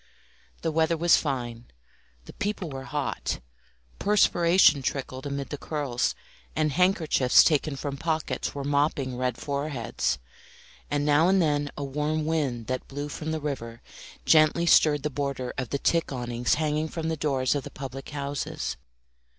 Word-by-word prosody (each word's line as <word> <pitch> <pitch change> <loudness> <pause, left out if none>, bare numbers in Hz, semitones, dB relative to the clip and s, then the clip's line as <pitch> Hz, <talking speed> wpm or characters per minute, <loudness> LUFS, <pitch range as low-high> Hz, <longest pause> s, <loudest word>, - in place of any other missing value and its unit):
The 165 - 0
weather 160 +1 +2
was 170 +1 +5
fine, 120 -5 -3 0.6
the - - -11
people 200 -5 -3
were 135 0 -6
hot, 145 -1 -2 0.6
perspiration 175 -6 +4
trickled 130 0 -3
amid 140 -1 -4
the 145 - -4
curls, 140 -6 -1 0.4
and 155 -1 +1
handkerchiefs 170 -7 +4
taken 150 -2 +1
from 140 0 -4
pockets 160 0 -2
were 140 - -3
mopping 140 -2 0
red 125 -1 -1
foreheads; 140 - -2 0.7
and 145 0 0
now 150 +3 +4
and 190 +1 +4
then 145 -3 +1
a 145 - -3
warm 150 +3 -1
wind 140 -8 -1
that 130 +1 -3
blew 145 +2 -5
from 155 +2 -5
the 160 - -1
river 120 -6 -5 0.4
gently 155 +2 +5
stirred 150 -3 +5
the 150 - -1
border 140 -2 -3
of 130 -3 -3
the 140 - -1
tick 165 +3 +1
awnings 120 -1 0
hanging 155 0 0
from 160 0 -4
the 160 - 0
doors 135 -4 +1
of 145 -2 -2
the - - -7
public 135 -1 -8
houses. 140 -1 -4
145 Hz, 155 wpm, -27 LUFS, 135-155 Hz, 0.7 s, was